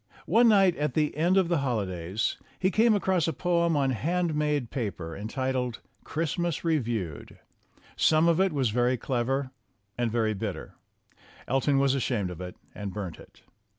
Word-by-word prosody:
One 235 Hz, +1 st, +5 dB
night 195 Hz, -5 st, +5 dB
at 150 Hz, +1 st, -1 dB
the 150 Hz, -3 st, +1 dB
end 175 Hz, +5 st, +2 dB
of 190 Hz, -3 st, +4 dB
the 170 Hz, -3 st, +1 dB
holidays 100 Hz, -7 st, -2 dB, 0.2 s
he 190 Hz, +1 st, +1 dB
came 220 Hz, +2 st, +4 dB
across 190 Hz, -4 st, +1 dB
a 165 Hz, -, 0 dB
poem 170 Hz, 0 st, +1 dB
on 135 Hz, -2 st, +2 dB
hand 170 Hz, +7 st, 0 dB
made 150 Hz, -5 st, 0 dB
paper, 95 Hz, -10 st, -4 dB
entitled 125 Hz, +3 st, -2 dB, 0.2 s
"Christmas 170 Hz, +1 st, -2 dB
Re 165 Hz, -2 st, +2 dB
viewed." 110 Hz, -, -4 dB, 0.6 s
Some 155 Hz, +1 st, +4 dB
of 170 Hz, 0 st, +3 dB
it 190 Hz, -1 st, +3 dB
was 135 Hz, -6 st, 0 dB
very 125 Hz, +2 st, +2 dB
clever 130 Hz, +2 st, -1 dB, 0.5 s
and 120 Hz, -2 st, +1 dB
very 110 Hz, -2 st, +1 dB
bitter. 100 Hz, -1 st, -5 dB, 0.7 s
Elton 135 Hz, +2 st, +2 dB
was 135 Hz, -1 st, +3 dB
ashamed 115 Hz, -8 st, -1 dB
of 90 Hz, -, -8 dB
it 90 Hz, 0 st, -7 dB, 0.2 s
and 100 Hz, -2 st, -5 dB
burnt 95 Hz, -4 st, -6 dB
it. -, -, -17 dB
135 Hz, 165 wpm, -27 LUFS, 110-165 Hz, 0.7 s, One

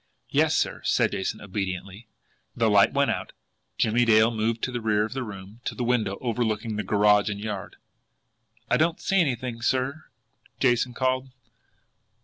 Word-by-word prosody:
"Yes, -, -, +3 dB
sir," -, -, -1 dB
said -, -, +2 dB
Jason 95 Hz, -, -3 dB
obediently. 95 Hz, +2 st, -5 dB, 0.5 s
The 115 Hz, -2 st, +2 dB
light 100 Hz, -1 st, +5 dB
went 140 Hz, 0 st, +2 dB
out. -, -, -4 dB, 0.4 s
Jimmie 115 Hz, +2 st, +2 dB
Dale 110 Hz, 0 st, +5 dB
moved 115 Hz, 0 st, -1 dB
to 125 Hz, -, -1 dB
the 120 Hz, -1 st, -3 dB
rear 105 Hz, -1 st, +2 dB
of 110 Hz, -, -7 dB
the 135 Hz, -, -3 dB
room 105 Hz, 0 st, -9 dB
to -, -, -3 dB
the 125 Hz, -, -3 dB
window 110 Hz, -5 st, 0 dB
overlooking 115 Hz, -2 st, -1 dB
the 105 Hz, -, -1 dB
garage 105 Hz, +1 st, +3 dB
and 100 Hz, -1 st, -4 dB
yard. 105 Hz, -2 st, -5 dB, 0.9 s
"I -, -, +2 dB
don't 165 Hz, +2 st, +1 dB
see 195 Hz, -1 st, +2 dB
anything, 125 Hz, -5 st, -2 dB
sir," 130 Hz, +5 st, -1 dB, 0.5 s
Jason 125 Hz, -1 st, +2 dB
called. 130 Hz, +1 st, 0 dB
115 Hz, 160 wpm, -26 LUFS, 105-125 Hz, 0.9 s, light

